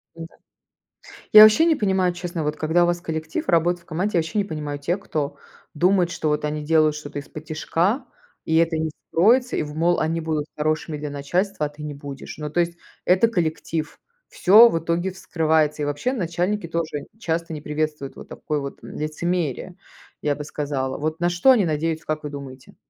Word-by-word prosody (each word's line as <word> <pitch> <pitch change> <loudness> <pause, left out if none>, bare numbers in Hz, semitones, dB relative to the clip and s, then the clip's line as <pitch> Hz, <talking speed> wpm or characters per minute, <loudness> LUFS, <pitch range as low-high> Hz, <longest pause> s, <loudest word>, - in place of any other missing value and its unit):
М-да. 165 0 -10 1.0
Я 215 0 +12
вообще 215 +10 +7
не 325 - +4
понимаю, 190 -6 +1
честно, 175 -2 -4
вот 150 0 -1
когда 160 +3 +2
у - - +3
вас 175 0 -1
коллектив, 160 -2 -4
работает 170 +1 +2
в - - -32
команде, 180 +4 -1
я - - +5
вообще 160 +6 -5
не 205 - +2
понимаю 150 -4 -5
тех, 175 +7 -1
кто 145 -6 -3 0.4
думает, 180 +2 +3
что 155 - -2
вот 150 0 0
они 150 0 -3
делают 155 -1 +3
что-то 145 -1 -6
исподтишка, 160 - -2 0.4
и 160 - 0
это 165 -1 +2
не 160 0 -1 0.2
вскроется, 245 +9 +3
и - - 0
в 150 0 -8
мол 170 +2 +2
они 165 +1 -1
будут 155 -2 -2
хорошими 155 0 -1
для 150 0 -5
начальства, 155 +5 -1
а - - -3
ты 150 +1 -11
не 150 -1 -5
будешь. 140 -1 -9
Ну, 150 -1 -5
то 165 - -1
есть, 170 0 0 0.3
это 185 +5 +4
коллектив, 160 -5 -2 0.3
всё 215 +6 +7
в 165 - 0
итоге 170 +3 -1
вскрывается. 160 -4 0
И, - - 0
вообще, 145 - -1
начальники 180 -1 -1
тоже 165 -3 -2
н - - -12
часто 165 -4 -2
не 150 - -6
приветствуют 150 -2 -3
вот - - -11
такое 150 -1 -3
вот, 140 -1 -7
м, - - -9
лицемерие, 170 +1 -2 0.5
я 145 -1 0
бы 150 - -6
сказала. 140 -3 -3
Вот 155 +2 -3
на 175 +1 +2
что 175 +9 +4
они 225 -7 +4
надеются, 160 0 -1
как 155 0 -3
вы 150 - -4
думаете? 135 -2 -10
160 Hz, 200 wpm, -23 LUFS, 150-175 Hz, 1.0 s, Я